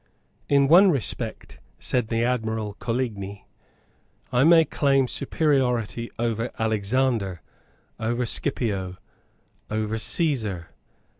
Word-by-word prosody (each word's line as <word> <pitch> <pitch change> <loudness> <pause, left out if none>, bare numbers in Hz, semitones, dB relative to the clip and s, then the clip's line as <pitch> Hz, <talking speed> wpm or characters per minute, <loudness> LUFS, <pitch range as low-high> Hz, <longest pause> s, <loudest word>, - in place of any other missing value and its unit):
"In 140 -1 +4
one 185 +6 +7
respect," 120 - -3 0.2
said 125 -3 0
the 115 0 0
Admiral 110 -4 -1
Coligni, 105 -5 -3 0.9
"I 125 +1 +4
may 165 +1 +6
claim 135 -3 +2
superiority 125 -6 0
over 115 0 -1
Alexander, 110 - 0 0.6
over 120 +2 -1
Scipio, 100 -9 -2 0.7
over 110 +1 -2
Caesar. 110 - 0
115 Hz, 90 wpm, -25 LUFS, 110-135 Hz, 0.9 s, one